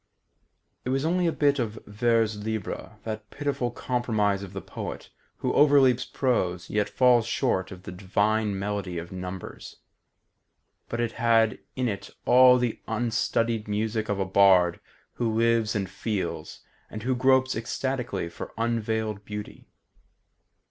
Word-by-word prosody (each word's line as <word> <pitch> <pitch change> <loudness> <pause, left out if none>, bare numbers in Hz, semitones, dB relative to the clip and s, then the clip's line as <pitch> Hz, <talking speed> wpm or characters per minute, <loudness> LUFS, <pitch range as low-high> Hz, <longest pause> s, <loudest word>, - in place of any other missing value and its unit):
It - - -3
was 135 +3 0
only 175 +1 +2
a - - +2
bit 145 -2 +2
of 110 -2 -2
vers 110 0 +1
libre, 110 -3 -4
that 110 -1 -6
pitiful 145 -4 -2
compromise 110 -5 0
of 100 -2 -8
the 100 - -5
poet - - -7 0.3
who - - -1
overleaps 140 -4 +5
prose 90 -9 -1
yet 105 -1 +1
falls 125 -3 +4
short 115 -6 0
of 90 -1 -10
the - - -7
divine 100 +3 0
melody 100 -2 -3
of 85 +1 -6
numbers; 90 0 -7 1.1
but 120 - -3
it 120 -1 0
had 115 -2 +2 0.2
in 130 -1 0
it 100 -3 -4 0.2
all 125 0 +7
the 125 -3 -2
unstudied 115 -1 0
music 110 +1 -1
of 105 - 0
a 95 - +1
bard 95 -2 +4 0.3
who 115 -2 -1
lives 115 -1 +2
and 100 -2 -1
feels, 100 +2 -4 0.3
and 110 0 -7
who 130 +1 +1
gropes 130 +1 +3
ecstatically 125 -2 -2
for 85 - -9
unveiled 110 -2 -1
beauty. 105 0 -8
110 Hz, 140 wpm, -26 LUFS, 100-120 Hz, 1.1 s, all